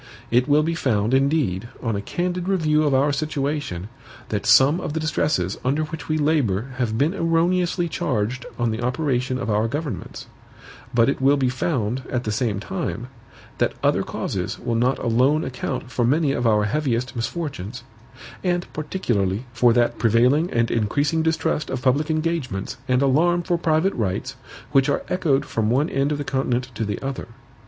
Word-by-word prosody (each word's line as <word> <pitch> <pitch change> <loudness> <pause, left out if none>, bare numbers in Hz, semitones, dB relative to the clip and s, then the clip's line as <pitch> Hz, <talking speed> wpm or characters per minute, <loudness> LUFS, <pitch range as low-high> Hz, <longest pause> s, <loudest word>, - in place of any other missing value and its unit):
It 125 +2 +3
will 150 +1 +4
be 165 +2 0
found, 115 -8 0
indeed, 135 - +1
on 115 -3 0
a 100 - -2
candid 175 - -2
review 155 -5 +2
of 145 - +2
our 140 +2 +3
situation, 140 - -2 0.4
that - - -2
some 145 +6 +6
of 145 - -4
the 160 - -1
distresses 150 - 0
under 140 +5 +1
which 155 0 -7
we 155 - +1
labor 135 -7 +1
have 110 -3 0
been 150 +7 +2
erroneously 175 0 +1
charged 125 -7 -2
on 120 -2 +1
the 110 - -3
operation 130 0 0
of 100 - -4
our 110 +1 +1
governments; 145 +2 -5 0.7
but 120 -2 +4
it 140 - 0
will 140 +2 +4
be 130 -2 +1
found, 130 -3 -1
at 125 -1 -1
the 110 - -2
same 105 -2 -1
time, 135 - -4 0.5
that - - +1
other - - +3
causes - - -3
will 120 -1 -3
not 125 +3 +2
alone 130 +7 +2
account 125 0 -4
for 120 - 0
many 145 +4 +2
of 120 -3 0
our 105 -1 +3
heaviest 125 +1 -1
misfortunes; 120 - -4 0.6
and, 175 -1 0
particularly, 120 - -1
for 120 0 +4
that 120 0 +2
prevailing 125 +9 +3
and 115 -1 +1
increasing 145 +9 +1
distrust 160 -1 0
of 130 -1 -3
public 140 +4 +2
engagements, 155 - -2
and 130 +1 +2
alarm 170 +6 +3
for 175 - 0
private 165 +3 +1
rights, 95 -6 -2 0.4
which 135 0 +4
are 140 - 0
echoed 150 -6 +1
from 110 -4 -1
one 135 +7 +2
end 135 +2 +1
of 150 - 0
the 145 - -3
continent 130 -2 -1
to 110 0 -2
the 105 0 -3
other. 135 -1 -4
135 Hz, 175 wpm, -23 LUFS, 120-155 Hz, 0.7 s, some